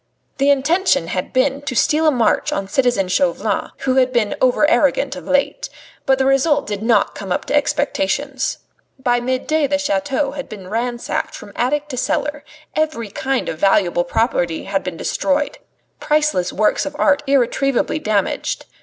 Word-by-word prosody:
The 275 +1 +3
intention 285 - +2
had 185 - -3
been 270 +2 +1
to 270 -3 -4
steal 310 +6 +3
a - - +6
march 245 -5 +1
on 195 - -2
citizen 245 -3 +1
Chauvelin, 265 +9 0
who 265 -1 +1
had 255 -1 +3
been 235 -4 +1
over 255 +4 +4
arrogant 285 -3 +2
of 275 - -9
late; 280 - 0 0.4
but 265 0 +4
the 265 - +1
result 270 +3 +2
did 205 -1 -4
not 230 +1 +2
come 195 -3 -7
up - - -1
to - - -1
expectations. 280 -1 0 0.4
By 245 -2 +1
midday 260 +5 0
the 285 +1 +1
chateau 290 -1 -1
had 275 -2 -7
been 195 -4 -9
ransacked 240 +2 -2
from 205 - -11
attic 290 +4 0
to 255 - -5
cellar; 295 +3 -1 0.3
every 305 -9 -1
kind 265 +4 -2
of 160 - -4
valuable 190 -3 +3
property 175 -4 0
had 195 0 -2
been 180 -3 -5
destroyed, 295 - -1 0.4
priceless 300 - +1
works 215 +7 +1
of 290 - -6
art 290 -1 +3
irretrievably 275 +2 +1
damaged. 210 -7 -1
265 Hz, 165 wpm, -19 LUFS, 215-290 Hz, 0.4 s, a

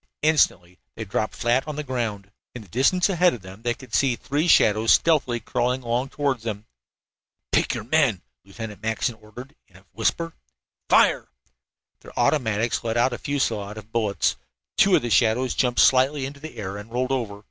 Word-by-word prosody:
Instantly 95 - +2 0.2
they 110 - -6
dropped 110 +2 -2
flat 120 +4 0
on 150 - -4
the 150 - -4
ground. 110 -7 -4 0.2
In 120 - -7
the - - -18
distance 135 - +2
ahead 180 -4 +3
of 110 - -13
them 95 +3 -12
they 120 0 -1
could 130 -4 -15
see 135 -3 +2
three 145 +7 -2
shadows 110 -7 +5
stealthily 145 -7 +2
crawling 125 +2 -1
along 120 +3 -1
toward 140 -3 -1
them. 110 -2 -5 0.9
"Pick - - +1
your - - -5
men!" 125 - +1 0.2
Lieutenant 105 +2 -9
Mackinson 110 +3 -1
ordered, 115 +5 -12
in 90 - -26
a 95 +1 -18
whisper. 165 +9 -1 0.6
"Fire!" - - +4 0.7
Their - - -15
automatics 115 -6 +1
let 115 0 -1
out 120 +2 +2
a - - -5
fusillade 110 -7 -2
of 110 +1 -11
bullets. 110 - 0 0.4
Two 195 -2 +5
of - - +1
the 120 - -3
shadows 125 +3 +2
jumped 125 -2 0
slightly 135 +2 +4
into 140 +1 -8
the 155 +2 -10
air, 100 -2 -5
and 105 +2 -10
then - - -16
rolled 130 +1 0
over. 115 -6 -2
120 Hz, 185 wpm, -24 LUFS, 110-135 Hz, 0.9 s, shadows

